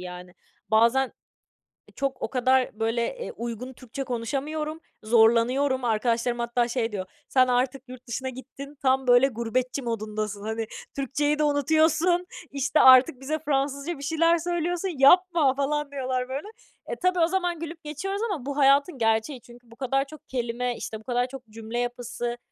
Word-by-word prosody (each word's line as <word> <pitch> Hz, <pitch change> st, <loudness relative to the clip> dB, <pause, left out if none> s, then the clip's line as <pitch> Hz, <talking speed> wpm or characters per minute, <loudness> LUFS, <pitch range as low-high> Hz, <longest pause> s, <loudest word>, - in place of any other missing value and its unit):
yani. 180 Hz, 0 st, -9 dB, 0.4 s
Bazen 235 Hz, +4 st, +3 dB, 0.8 s
e -, -, -19 dB
çok 275 Hz, -1 st, -2 dB
o -, -, -2 dB
kadar, 255 Hz, -3 st, +1 dB
böyle, 230 Hz, +1 st, 0 dB
eee, 485 Hz, -, -5 dB
uygun 240 Hz, +2 st, -6 dB
Türkçe 255 Hz, +2 st, -7 dB
konuşamıyorum, 295 Hz, +6 st, -3 dB, 0.2 s
zorlanıyorum. 235 Hz, +4 st, +3 dB
Arkadaşlarım 235 Hz, +2 st, 0 dB
hatta 235 Hz, 0 st, 0 dB
şey 235 Hz, -2 st, -1 dB
diyor: 190 Hz, -2 st, -4 dB, 0.2 s
"Sen 255 Hz, -1 st, +4 dB
artık 250 Hz, +1 st, 0 dB
yurt 255 Hz, 0 st, -12 dB
dışına 260 Hz, +3 st, -3 dB
gittin, 275 Hz, +3 st, -10 dB
tam, 265 Hz, -1 st, +2 dB
böyle, 245 Hz, +2 st, +6 dB
gurbetçi 250 Hz, +2 st, -2 dB
modundasın. 215 Hz, -3 st, -4 dB
Hani, 220 Hz, +1 st, -3 dB, 0.3 s
Türkçeyi 290 Hz, +2 st, 0 dB
de 305 Hz, -, +3 dB
unutuyorsun 315 Hz, +4 st, +2 dB, 0.3 s
işte, 280 Hz, +2 st, +1 dB
artık 260 Hz, +1 st, +7 dB
bize 310 Hz, +4 st, -2 dB
Fransızca 280 Hz, +2 st, -1 dB
bir 280 Hz, -, -9 dB
şeyler 330 Hz, +3 st, +3 dB
söylüyorsun. 350 Hz, +2 st, -2 dB
Yapma!" 330 Hz, -2 st, +5 dB
falan 285 Hz, +1 st, -1 dB
diyorlar 255 Hz, -2 st, -2 dB
böyle. 280 Hz, +9 st, -4 dB, 0.4 s
E, -, -, -3 dB
tabii 365 Hz, 0 st, +2 dB
o 330 Hz, -, +4 dB
zaman 355 Hz, -2 st, -1 dB
gülüp 330 Hz, 0 st, -7 dB
geçiyoruz 385 Hz, +8 st, -4 dB
ama 290 Hz, -10 st, -4 dB
bu 280 Hz, 0 st, -4 dB
hayatın 280 Hz, +2 st, +4 dB
gerçeği. 225 Hz, +3 st, 0 dB
Çünkü 240 Hz, -1 st, -17 dB
bu -, -, -13 dB
kadar 270 Hz, +2 st, 0 dB
çok 310 Hz, +1 st, -14 dB
kelime, 245 Hz, -1 st, -2 dB
işte, 220 Hz, -, -6 dB
bu -, -, -17 dB
kadar 245 Hz, +1 st, 0 dB
çok 255 Hz, -2 st, -10 dB
cümle 225 Hz, +2 st, -5 dB
yapısı, 245 Hz, 0 st, -3 dB
260 Hz, 165 wpm, -26 LUFS, 235-295 Hz, 0.8 s, artık